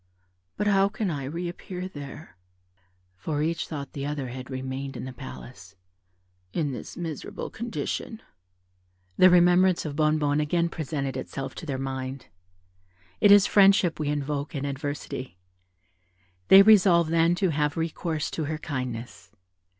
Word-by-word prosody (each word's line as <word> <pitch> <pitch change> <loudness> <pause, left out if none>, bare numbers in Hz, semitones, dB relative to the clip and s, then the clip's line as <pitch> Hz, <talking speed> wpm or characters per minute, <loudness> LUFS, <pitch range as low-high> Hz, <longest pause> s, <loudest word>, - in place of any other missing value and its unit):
But 210 - -1
how 195 -1 +4
can 205 -2 -2
I 140 -3 -4
reappear 175 +4 -5
there 145 -1 -10 0.8
(for 145 - -2
each 165 +1 -1
thought 140 -4 -6
the 140 - -5
other 145 -3 -3
had 130 +1 -8
remained 130 +1 -5
in - - -6
the 130 - -7
palace) 120 -7 -11 0.8
in 150 -4 -1
this 125 - -8
miserable 165 -4 -5
condition?" 230 -1 -4 1.0
The 185 - +8
remembrance 180 0 +4
of 145 -2 -4
Bonnebonne 150 -1 +2
again 170 +3 +1
presented 140 -5 -4
itself 135 0 -5
to 165 - -9
their 135 -2 -2
mind. 130 0 -5 0.9
It 205 - +6
is 205 -1 +8
friendship 195 -4 +4
we 150 -1 -1
invoke 145 0 -3
in 140 0 -2
adversity. 140 - -5 1.1
They 195 - +9
resolved 185 -6 +5
then 165 +1 +3
to 190 0 +1
have 150 0 0
recourse 165 -1 -2
to 160 - -3
her 155 +1 -3
kindness. 125 - -6
150 Hz, 140 wpm, -26 LUFS, 135-175 Hz, 1.1 s, They